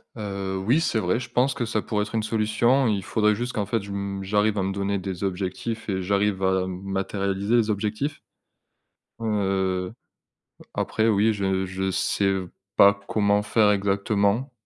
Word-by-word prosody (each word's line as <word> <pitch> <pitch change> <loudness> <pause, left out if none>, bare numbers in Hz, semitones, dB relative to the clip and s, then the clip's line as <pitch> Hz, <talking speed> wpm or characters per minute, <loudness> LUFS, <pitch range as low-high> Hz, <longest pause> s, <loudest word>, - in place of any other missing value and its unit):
Heu, 100 -3 -4
oui. 130 +8 +4
C'est 110 - +1
vrai, 90 +5 0
je 130 0 -7
pense 125 +2 +2
que 125 -4 -2
ça 110 -1 -1
pourrait 105 -1 -1
être 105 +2 -6
une 110 - +1
solution. 115 +4 +2
Il 100 -4 0
faudrait 105 +1 +2
juste 120 +3 -3
qu'en 105 -2 -1
fait 110 +1 -1
je 100 - -8
m 100 0 -3
j'arrive 105 +2 +1
à 95 - +1
me 95 - -1
donner 100 0 -1
des 95 0 -5
objectifs 100 +4 -3
et 95 -1 -1
j'arrive 100 0 0
à, 95 0 +2
m 95 0 -5
matérialiser 100 +2 -1
les 110 -2 +3
objectifs 105 +8 -2 1.0
heu, 95 -3 -1 0.8
après, 110 +1 0
oui, 110 +1 +3
je 95 -1 0
je 95 +1 -2
sais 95 +1 +1 0.4
pas 100 0 +8
comment 105 -1 +2
faire 105 -1 +3
exactement. 100 +5 +1
100 Hz, 170 wpm, -25 LUFS, 95-110 Hz, 1.0 s, pas